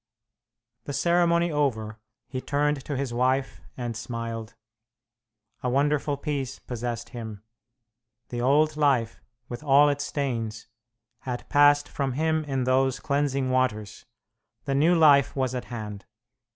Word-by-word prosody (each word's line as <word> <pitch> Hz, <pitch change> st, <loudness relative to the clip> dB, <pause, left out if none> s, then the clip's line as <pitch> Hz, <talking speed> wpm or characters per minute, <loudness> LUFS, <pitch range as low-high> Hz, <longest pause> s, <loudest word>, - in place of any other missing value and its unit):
The 145 Hz, -, -5 dB
ceremony 170 Hz, +3 st, +2 dB
over, 110 Hz, -7 st, -1 dB, 0.3 s
he 130 Hz, 0 st, -5 dB
turned 145 Hz, 0 st, 0 dB
to 145 Hz, -, -3 dB
his 135 Hz, -3 st, -3 dB
wife 130 Hz, +2 st, 0 dB, 0.2 s
and 120 Hz, -2 st, -4 dB
smiled. 115 Hz, 0 st, -5 dB, 1.1 s
A 125 Hz, -, -1 dB
wonderful 145 Hz, +2 st, +1 dB
peace 140 Hz, -3 st, -3 dB
possessed 120 Hz, -1 st, -5 dB
him. 110 Hz, -4 st, -8 dB, 0.9 s
The 120 Hz, -1 st, -3 dB
old 150 Hz, +4 st, +3 dB
life, 135 Hz, -7 st, +1 dB, 0.3 s
with 120 Hz, +3 st, -7 dB
all 145 Hz, 0 st, +6 dB
its 145 Hz, 0 st, -1 dB
stains, 115 Hz, -7 st, -3 dB, 0.5 s
had 125 Hz, -2 st, -5 dB
passed 145 Hz, 0 st, +5 dB
from 135 Hz, -2 st, -2 dB
him 160 Hz, +3 st, 0 dB
in 135 Hz, -3 st, -1 dB
those 130 Hz, +1 st, +2 dB
cleansing 140 Hz, -2 st, 0 dB
waters; 110 Hz, -6 st, -1 dB, 0.6 s
the 140 Hz, -, -1 dB
new 155 Hz, +6 st, +4 dB
life 145 Hz, -4 st, +5 dB
was 130 Hz, -2 st, -1 dB
at 125 Hz, -, -4 dB
hand. 105 Hz, -4 st, -7 dB
135 Hz, 130 wpm, -26 LUFS, 120-145 Hz, 1.1 s, all